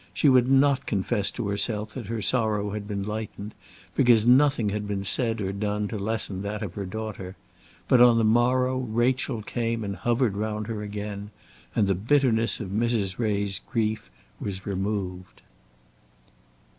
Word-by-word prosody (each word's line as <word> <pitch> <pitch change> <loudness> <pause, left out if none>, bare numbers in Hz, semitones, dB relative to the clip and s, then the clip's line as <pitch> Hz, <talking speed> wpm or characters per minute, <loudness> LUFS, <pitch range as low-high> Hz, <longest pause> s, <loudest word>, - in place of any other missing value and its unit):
She 145 - +4
would 130 -1 +4
not 135 0 +3
confess 100 0 +1
to 120 - -4
herself 105 +1 -1
that 120 -6 -7
her 110 -1 -3
sorrow 105 -4 +1
had 105 -1 -5
been 100 -2 -3
lightened, 105 0 -5 0.4
because 120 -4 +4
nothing 130 -3 +4
had 105 0 -3
been 100 -1 -2
said 115 +3 -1
or 95 -2 -2
done 105 +1 -2
to 110 - -4
lessen 100 -2 -2
that 105 +2 -4
of 95 -4 -5
her 100 -1 -5
daughter; 100 -2 -6 0.5
but 125 - +5
on 120 -1 +7
the 115 - +3
morrow 125 +3 +2
Rachel 120 0 0
came 115 0 -2
and 100 -1 -4
hovered 120 -2 0
round 105 0 -2
her 110 -1 -4
again, 105 0 -6 0.5
and 105 -3 +3
the 95 - +3
bitterness 115 +2 +2
of 100 - -5
Mrs. 105 -2 -1
Ray's 100 -4 0
grief 110 - -2 0.3
was 95 -1 -5
removed. 95 -2 -4
110 Hz, 160 wpm, -26 LUFS, 100-120 Hz, 0.5 s, on